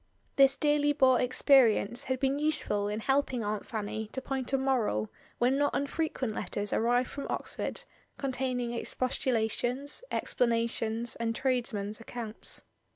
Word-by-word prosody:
This 275 0 +6
dearly 295 0 +2
bought 260 -3 +4
experience 245 -3 +4
had 260 -1 -1
been 275 +1 +1
useful 295 -9 0
in 210 +2 -3
helping 270 -2 +1
Aunt 210 0 -3
Fanny 220 0 -4
to - - -1
point 265 -1 -3
a 270 - +3
moral 240 - 0 0.3
when 255 +3 +2
not 290 0 +1
unfrequent 280 -4 -1
letters 205 -1 -3
arrived 245 +2 +2
from 280 - -6
Ox - - -3
ford - - -4 0.3
containing 255 -3 -2
expostulations, 250 - -1
explanations, 230 -1 0
and 230 0 -1
tradesmen's 230 -6 -1
accounts. 230 -1 -3
250 Hz, 135 wpm, -30 LUFS, 225-270 Hz, 0.3 s, This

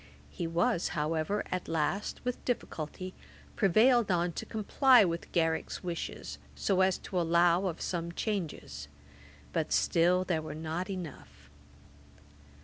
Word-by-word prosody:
He 170 - -3
was, 170 +1 +1
however, 160 +6 0
at 185 -1 -2
last, 165 +5 -1
with 250 -1 -3
difficulty, 185 -6 -4 0.4
prevailed 225 +4 +4
on 175 -1 +2
to - - -6
comply 235 +2 +5
with 170 -1 -3
Garrick's 160 +1 0
wishes, 175 -2 -5 0.2
so 190 -2 +1
as 190 -1 +3
to 180 -2 -2
allow 170 +2 +3
of 170 -2 -4
some 170 -1 -2
changes; 165 - -4 0.7
but 160 -2 -1
still 180 +2 +3
there 175 -4 0
were 155 - -6
not 160 +4 -3
enough. 150 - -8
175 Hz, 130 wpm, -31 LUFS, 165-190 Hz, 0.7 s, comply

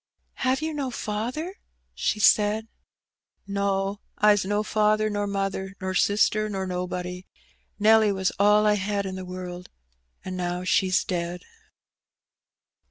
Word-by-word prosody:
"Have 260 +3 +1
you 315 0 -2
no 280 -3 -2
father?" 250 - -4 0.4
she 215 - -1
said. 210 +1 +4 0.8
"No: 200 0 -1 0.2
Fs 210 -1 +5
no 205 +2 0
father, 215 0 +2
nor 205 0 -1
mother, 195 -1 -3
nor 190 0 -3
sister, 215 +3 +2
nor 195 -2 -3
nobody. 180 0 -4 0.5
ITelly 215 0 +5
was 190 -1 0
all 210 +1 +5
I 210 - +5
had 200 0 -1
in 190 - -4
the 185 0 -6
world, 180 0 -7 0.6
an' 185 0 -4
now 180 0 -2
she's 185 0 +2
dead." 175 -1 -3
200 Hz, 130 wpm, -25 LUFS, 185-215 Hz, 0.8 s, Fs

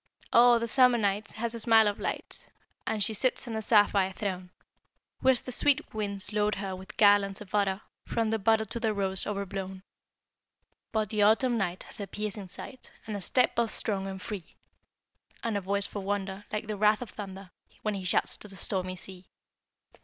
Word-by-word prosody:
Oh, 240 0 +7
the 235 0 -2
Summer 250 0 +5
night 205 -1 -1
Has 230 +2 -3
a 230 - -5
smile 225 -1 +5
of 205 - -1
light - - -5 0.4
And 215 -2 +1
she 220 - +2
sits 255 +4 +1
on 225 - -4
a 220 - -2
sapphire 205 -3 +4
throne; 185 -3 -4 0.7
Whilst 260 -2 +3
the 255 - -5
sweet 285 +2 +2
winds 205 -1 -1
load 210 0 +1
her 195 -1 -4
With 190 +3 -11
garlands 200 -2 +4
of 210 -2 -12
odor, 200 -1 +1 0.3
From 225 -1 0
the 225 - 0
bud 220 +1 +2
to 235 - -3
the 220 -2 0
rose 190 -1 -1
o'erblown! 195 -2 -4 1.1
But 215 -2 -1
the 215 -1 +1
Autumn 225 +4 +4
night 185 -5 -2
Has - - -5
a 200 - -4
piercing 210 -1 -4
sight, 255 +7 -10
And 215 - -4
a 200 - -4
step 250 +6 +2
both 230 -2 0
strong 195 -3 -1
and 190 0 -6
free; 185 -2 -7 0.9
And 230 -2 -1
a 200 - 0
voice 200 +1 -1
for 205 - -5
wonder, 195 0 -3
Like 210 +1 -2
the 215 -1 -4
wrath 210 +3 +3
of 235 - -11
the - - -18
thunder, 195 -2 -8 0.3
When 215 - 0
he 195 -2 -4
shouts 180 - +1
to - - -11
the 195 - -11
stormy 185 -1 -2
sea! 185 0 -11
205 Hz, 200 wpm, -29 LUFS, 195-220 Hz, 1.1 s, Oh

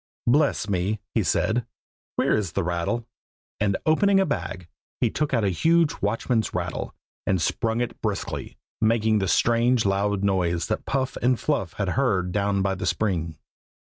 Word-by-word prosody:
"Bless 140 -3 +2
me!" 100 +2 0
he - - +2
said. 120 +2 +1 0.5
"Where - - +2
is 100 -7 -2
the - - 0
rattle?" 90 +7 -1 0.5
and 100 -2 +1
opening 195 +5 +4
a 195 - +3
bag, 95 - -4 0.3
he - - +2
took 150 0 -1
out 115 -5 +2
a 100 - +3
huge 165 - +2
watchman's 110 +1 0
rattle, 90 -1 -3 0.3
and 95 - +2
sprung 115 +7 0
it 120 - -4
briskly, - - -3 0.2
making 110 -1 +3
the 95 - -1
strange 120 +2 +3
loud 100 0 +1
noise 90 -4 +1
that - - -2
Puff 135 -1 -1
and 125 0 +2
Fluff 135 - -1
had 100 -3 -2
heard 100 -6 +1
down 100 0 +1
by 95 0 +1
the 95 -1 -4
spring. 85 -7 -1
105 Hz, 165 wpm, -25 LUFS, 95-120 Hz, 0.5 s, opening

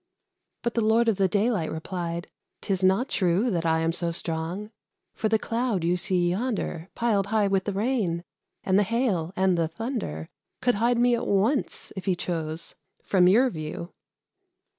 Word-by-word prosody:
But 235 - 0
the 230 - +1
Lord 225 +2 +3
of 210 - +1
the 195 - +3
Daylight 205 -3 +1
replied, 170 +1 -4 0.3
"'Tis 190 -2 -1
not 190 +7 +3
true 190 +4 +1
That 170 -3 0
I 160 0 +2
am 165 0 +1
so 170 0 -2
strong; 170 +4 -3 0.4
for 220 - -1
the 220 - +4
Cloud 230 -4 -1
you 175 +1 +2
see 180 -1 +1
yonder, 195 -5 -2
Piled 210 -5 +1
high 215 -1 +2
with 195 -1 +1
the 205 - -1
rain, 200 -6 0 0.4
and 190 +1 +3
the - - +5
hail, 205 -6 0
and 185 -2 +2
the 165 - +2
thunder, 170 - -4 0.3
Could 245 - +2
hide 240 +1 +3
me 245 +1 +4
at 235 - -3
once, 215 +8 0
if 190 - -6
he 190 -3 +2
chose, 165 -2 -4 0.3
from 180 -2 +4
your 240 +7 +5
view." 155 +1 -6
190 Hz, 175 wpm, -26 LUFS, 170-225 Hz, 0.4 s, the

